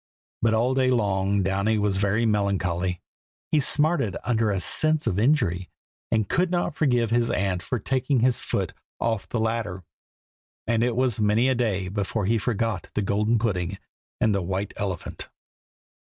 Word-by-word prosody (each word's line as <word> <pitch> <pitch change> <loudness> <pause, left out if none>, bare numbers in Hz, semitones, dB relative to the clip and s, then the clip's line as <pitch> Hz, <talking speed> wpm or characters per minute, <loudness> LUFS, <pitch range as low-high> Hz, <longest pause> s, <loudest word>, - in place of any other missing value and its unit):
But 110 0 +3
all 120 +4 +2
day 130 -1 +2
long 100 -4 +1
Downy 100 +4 +1
was 105 -2 +1
very 100 +4 +1
melancholy. 95 -4 0 0.5
He 155 - +4
smarted 145 - +2
under 115 -2 +1
a 100 -2 0
sense 155 +10 +2
of 95 - 0
injury, 105 - +1 0.4
and 110 -2 +1
could 180 +1 +1
not 175 -2 0
forgive 125 -7 +1
his 120 0 +2
aunt 90 -1 0
for 125 - -2
taking 130 +2 0
his 125 -1 +3
foot - - -2 0.3
off 115 -3 -1
the 120 - -1
ladder; 110 -5 -2 0.8
and 115 0 +1
it 120 -1 +1
was 125 -3 +1
many 110 +4 +3
a - - +3
day 105 -7 -1
before 100 +2 -2
he 115 +3 +2
forgot 115 -3 -2
the 105 - +1
golden 105 +4 +1
pudding 95 -4 -1 0.4
and 110 - +3
the 100 - 0
white 95 +3 -3
elephant. 95 -4 -5
110 Hz, 165 wpm, -25 LUFS, 95-120 Hz, 0.8 s, He